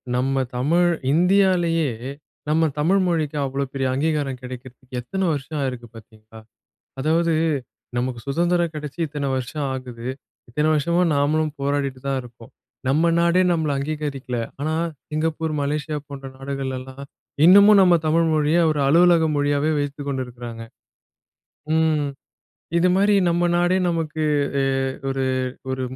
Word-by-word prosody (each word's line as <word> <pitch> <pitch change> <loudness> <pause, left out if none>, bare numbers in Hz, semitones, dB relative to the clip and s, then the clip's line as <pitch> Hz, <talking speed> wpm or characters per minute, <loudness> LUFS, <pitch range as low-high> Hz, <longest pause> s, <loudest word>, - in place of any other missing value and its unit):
நம்ம 135 +2 0 0.2
தமிழ் 170 +7 +3 0.2
இந்தியாலயே, 175 -3 +3 0.6
நம்ம 160 0 +3
தமிழ் 185 +6 +3
மொழிக்கு 155 -3 -1
அவ்வளோ 135 +1 -2
பெரிய 135 -1 -1
அங்கீகாரம் 140 -2 -1
கிடைக்கிறதுக்கு 125 0 -9
எத்தன 190 +9 -2
வருஷம் 145 +2 -4
ஆயிருக்கு 125 -3 -4
பார்த்தீங்களா? 110 0 -14 0.6
அதாவது 165 +3 +2 0.6
நமக்கு 125 -1 -2
சுதந்திரம் 170 +3 +1
கிடைச்சு 150 0 -7
இத்தனை 145 -1 -3
வருஷம் 140 +3 -3
ஆகுது. 125 -2 -7 0.4
இத்தனை 150 +5 0
வருஷமா 170 +4 +1
நாமளும் 150 +2 +1
போராடிட்டு 140 -2 -1
தான் 135 -1 0
இருக்கோம். 115 -1 -14 0.4
நம்ம 160 +5 +3
நாடே 170 +2 +3
நம்மள 160 -3 0
அங்கீகரிக்கல. 140 -3 -4 0.2
ஆனா 155 +2 -1 0.4
சிங்கப்பூர், 155 0 -1
மலேசியா 150 +1 -2
போன்ற 140 -1 -8
நாடுகள்லாம் 135 0 -5 0.4
இன்னமும் 200 +4 +8
நம்ம 180 -2 +6
தமிழ் 165 +2 +3
மொழிய 155 +2 +2
ஒரு 150 -2 -1
அலுவலக 170 +2 +5
மொழியாவே 145 +1 +1
வைத்துக்கொண்டிருக்குறாங்க. 130 -5 -5 1.1
ம் 160 -2 +2 0.7
இது 180 +2 +3
மாதிரி 205 +2 +4
நம்ம 170 0 +1
நாடே 175 +1 +2
நமக்கு 160 -2 -2 0.4
எ - - +2 0.4
ஒரு, 135 0 -1 0.5
ஒரு 130 0 -2
150 Hz, 125 wpm, -22 LUFS, 135-165 Hz, 1.1 s, இன்னமும்